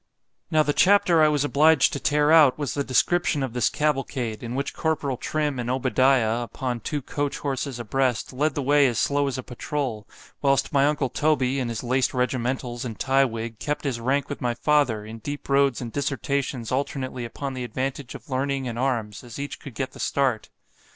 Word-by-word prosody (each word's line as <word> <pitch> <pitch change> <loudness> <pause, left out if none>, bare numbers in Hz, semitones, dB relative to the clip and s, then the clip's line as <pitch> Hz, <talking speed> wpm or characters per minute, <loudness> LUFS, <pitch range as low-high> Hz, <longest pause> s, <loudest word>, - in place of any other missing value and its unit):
Now 155 0 +4
the 145 0 0
chapter 185 -3 +4
I 155 - +6
was 150 -2 +1
obliged 155 +4 +4
to 140 - -2
tear 145 +3 +2
out, 150 -6 +6
was 145 -3 -3
the 140 - -1
description 145 +2 +1
of 130 -4 -4
this 125 -3 +2
cavalcade, 135 -6 -1
in 120 +1 -5
which 140 +1 -2
Corporal 155 -4 -1
Trim 150 +1 -2
and 120 0 -3
Obadiah, 130 -2 +2
upon 120 0 -4
two 145 +5 -4
coach 145 +1 -2
horses 135 -2 -3
a 120 - -5
breast, 130 +1 -1
led 145 +3 0
the 145 - -1
way 145 +1 +4
as 120 -3 -1
slow 145 0 +1
as 135 - -2
a 130 - -5
patrole——whilst 135 +1 -3
my 140 0 +4
uncle 145 -3 0
Toby, 135 -2 +1
in 125 -2 -2
his 115 0 -4
laced 130 +2 +1
regimentals 125 0 -1
and 115 -4 -5
tye 135 +1 +3
wig, 115 -2 -5
kept 150 0 -3
his 135 -5 -2
rank 135 +4 0
with 145 - -6
my 120 -2 0
father, 125 -5 +1
in 110 +1 -8
deep 145 +5 -6
roads 140 -2 +2
and 120 -2 -5
dissertations 140 -3 -2
alternately 130 -1 -2
upon 135 +4 -5
the 130 -1 -4
advantage 130 +2 -4
of - - -11
learning 135 -1 -1
and 120 -1 -4
arms, 120 -5 -2
as 120 -2 -10
each 140 0 -5
could 135 -5 -10
get 130 +1 -3
the - - -14
start. 130 -6 0
135 Hz, 200 wpm, -24 LUFS, 120-145 Hz, -, I